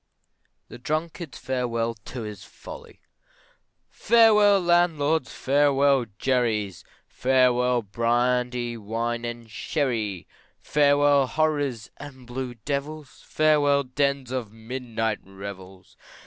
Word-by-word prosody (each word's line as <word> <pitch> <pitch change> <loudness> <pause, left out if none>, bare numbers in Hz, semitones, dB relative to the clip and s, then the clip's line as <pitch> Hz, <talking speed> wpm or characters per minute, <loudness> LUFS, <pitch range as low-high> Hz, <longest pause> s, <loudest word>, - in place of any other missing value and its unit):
THE - - -11
DRUNKARD'S 155 +2 -4
FAREWELL 120 -3 -2
TO 115 +3 -8
HIS 105 -2 -8
FOLLY! - - -12 0.9
Farewell 210 -3 +5
landlords, 165 -4 +2
farewell 140 -2 +2
jerry's, 110 -8 0 0.2
Farewell 125 -1 +2
brandy, 120 +2 0
wine, 115 +2 -3
and 120 -1 -6
sherry, 110 - -2 0.3
Farewell 145 -1 +3
horrors 145 -7 -1
and 135 -3 -11
blue 125 0 -5
devils, 140 +4 -5
Farewell 145 -2 +3
dens 140 0 -1
of 125 -5 -3
midnight 115 -1 -3
revels. 95 -1 -11
125 Hz, 90 wpm, -25 LUFS, 115-145 Hz, 0.9 s, Farewell